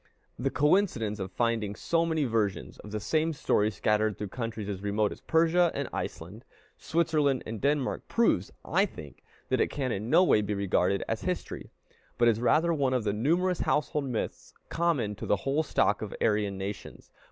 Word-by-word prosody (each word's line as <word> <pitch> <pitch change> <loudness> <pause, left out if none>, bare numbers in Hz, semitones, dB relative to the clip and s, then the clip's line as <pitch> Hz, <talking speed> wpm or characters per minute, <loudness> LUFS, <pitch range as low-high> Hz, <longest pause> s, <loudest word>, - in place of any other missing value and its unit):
The 135 +2 0
coincidence 145 - +1
of 95 0 -4
finding 115 -2 -1
so 165 +7 0
many 160 -2 0
versions 110 -6 -1
of 105 - -10
the 105 +1 -3
same 160 +8 0
story 105 -6 +1
scattered 105 0 0
through 105 -1 -5
countries 115 -2 -5
as 100 -2 -4
remote 105 +1 0
as - - -9
Persia 165 +2 +3
and 140 -2 -2
Iceland, 95 +9 -6 0.3
Switzerland 155 -5 +1
and 110 -1 -6
Denmark, 140 -1 0
proves, 225 - +1
I 195 +6 +2
think, 75 - -12 0.3
that - - +2
it - - +3
can 130 -3 -2
in 105 +3 -3
no 170 +6 +6
way 110 - +4
be 105 0 -2
regarded 100 -1 +1
as - - -2
history, - - -4 0.5
but 120 - +4
is 115 -1 +2
rather 160 +7 +3
one 135 -4 +1
of 125 - 0
the 105 -1 0
numerous 170 - +1
household 150 -1 0
myths 125 -4 -4
common 165 -11 0
to - - -6
the - - +3
whole 140 +3 +2
stock 105 -8 +1
of 110 - -5
Aryan 105 -2 +1
nations. 100 +2 -7
120 Hz, 185 wpm, -28 LUFS, 105-155 Hz, 0.5 s, no